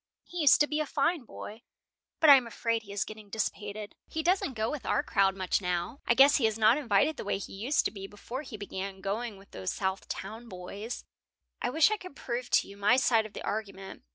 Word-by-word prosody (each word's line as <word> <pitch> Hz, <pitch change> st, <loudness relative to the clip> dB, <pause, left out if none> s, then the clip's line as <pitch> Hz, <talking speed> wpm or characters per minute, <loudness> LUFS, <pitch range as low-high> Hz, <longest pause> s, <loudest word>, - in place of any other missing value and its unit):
He 355 Hz, -, -7 dB
used 285 Hz, -5 st, +7 dB
to 295 Hz, -, +5 dB
be 300 Hz, +1 st, -1 dB
a 305 Hz, -, -1 dB
fine 300 Hz, 0 st, 0 dB
boy, 220 Hz, +1 st, -9 dB, 0.6 s
but 320 Hz, -, +5 dB
I -, -, +12 dB
am 255 Hz, -3 st, +2 dB
afraid 230 Hz, 0 st, -1 dB
he 200 Hz, -2 st, -12 dB
is 200 Hz, -1 st, -1 dB
getting 215 Hz, -1 st, -10 dB
dissipated. 210 Hz, 0 st, -4 dB
He 320 Hz, -, -3 dB
doesn't 345 Hz, -6 st, +1 dB
go 220 Hz, 0 st, -1 dB
with 300 Hz, -3 st, -5 dB
our 285 Hz, -, +1 dB
crowd 195 Hz, -7 st, +2 dB
much 190 Hz, +1 st, 0 dB
now. 180 Hz, +7 st, -2 dB
I 235 Hz, -, +4 dB
guess 280 Hz, +3 st, +7 dB
he 235 Hz, -6 st, +3 dB
is 220 Hz, 0 st, -2 dB
not 225 Hz, +5 st, +5 dB
invited 245 Hz, +3 st, +2 dB
the -, -, -5 dB
way 200 Hz, -, -1 dB
he 195 Hz, -, -8 dB
used 235 Hz, +9 st, +1 dB
to -, -, +1 dB
be 195 Hz, -2 st, -7 dB
before 235 Hz, +6 st, -7 dB
he 255 Hz, -7 st, -8 dB
began 195 Hz, -1 st, -6 dB
going 210 Hz, +2 st, -3 dB
with 195 Hz, +1 st, -18 dB
those 95 Hz, -1 st, -3 dB
South 190 Hz, 0 st, -2 dB
Town 225 Hz, +5 st, -6 dB
boys." 200 Hz, +5 st, -7 dB, 0.6 s
"I -, -, 0 dB
wish 315 Hz, -, +4 dB
I 430 Hz, -, +1 dB
could 365 Hz, -7 st, -11 dB
prove 245 Hz, -1 st, -4 dB
to -, -, +3 dB
you 200 Hz, -, -12 dB
my 205 Hz, +4 st, +4 dB
side 230 Hz, -4 st, +3 dB
of 215 Hz, -, -21 dB
the -, -, -7 dB
argument. 195 Hz, -3 st, -5 dB
220 Hz, 240 wpm, -29 LUFS, 200-270 Hz, 0.6 s, I